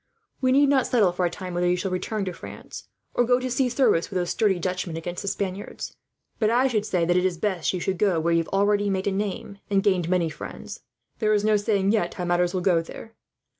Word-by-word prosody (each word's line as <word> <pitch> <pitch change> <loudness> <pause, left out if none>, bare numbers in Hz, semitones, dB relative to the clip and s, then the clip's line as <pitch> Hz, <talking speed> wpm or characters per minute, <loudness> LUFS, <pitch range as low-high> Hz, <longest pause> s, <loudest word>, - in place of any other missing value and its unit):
We 255 -1 +3
need 280 +2 +5
not 270 -3 +3
settle, 210 -7 +3
for 180 0 0
a - - -2
time, 180 +1 -7
whether 175 0 +1
you 180 - +3
shall 185 +1 -3
return 200 +3 -2
to 185 - -4
France, - - -10 0.3
or 245 - +3
go 245 +1 +3
to 255 0 -3
see 255 +1 +1
service 245 -9 +2
with 190 - -3
those 175 -1 -1
sturdy 205 -5 +2
Dutchmen 180 -2 -3
against 175 +2 -5
the 200 - -7
Spaniards. 195 0 -4 0.4
But 215 - +3
I 245 +3 +3
should 215 -4 -1
say 180 -5 +1
that 175 +1 +2
it 180 - +2
is 185 -2 0
best 185 -2 0
you 185 - -3
should 185 0 -2
go 190 -6 +2
where 170 +1 +1
you 165 - +4
have 165 - -2
already 205 +1 +2
made 190 -1 -1
a 200 - +1
name, 200 0 -4
and 195 -1 +2
gained 180 -4 +1
many 175 -3 +1
friends. 150 - -8 0.4
"There 215 -1 +2
is 205 0 0
no 215 0 +4
saying, 205 -1 +1
yet, 190 -6 0
how 180 - -3
matters 175 0 +1
will 185 -1 -2
go 175 -2 +3
there. 220 +6 -10
190 Hz, 250 wpm, -25 LUFS, 175-215 Hz, 0.4 s, need